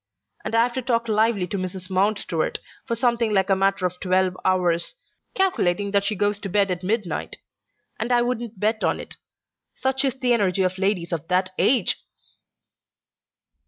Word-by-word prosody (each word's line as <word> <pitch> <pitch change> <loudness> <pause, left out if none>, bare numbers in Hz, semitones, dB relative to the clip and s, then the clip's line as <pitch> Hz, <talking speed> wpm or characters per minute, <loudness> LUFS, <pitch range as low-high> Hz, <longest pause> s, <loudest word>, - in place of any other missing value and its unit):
And 230 - -2
I've 235 +2 +3
to 260 - -2
talk 235 -2 0
lively 215 -3 +2
to 195 +2 -4
Mrs. 185 0 -6
Mountstuart 190 -4 0 0.3
for 235 - 0
something 235 -2 +1
like 195 0 +2
a - - +5
matter 195 0 +1
of 180 0 -2
twelve 185 0 +1
hours, 180 - +1 0.4
calculating 205 - +1
that 200 0 +2
she 215 - 0
goes 205 +1 0
to 200 - -5
bed 200 0 +2
at 180 -1 -2
midnight: 210 -1 -2 0.6
and 230 +3 -2
I 240 -1 +4
wouldn't 240 -4 -3
bet 215 +2 0
on - - +1
it; - - -9 0.6
such 265 +1 0
is 265 -1 0
the 250 -1 +2
energy 195 -4 +2
of 185 0 -1
ladies 190 -3 0
of 165 -1 -4
that 185 +1 +1
age!" 255 0 +3
200 Hz, 170 wpm, -23 LUFS, 185-235 Hz, 0.6 s, a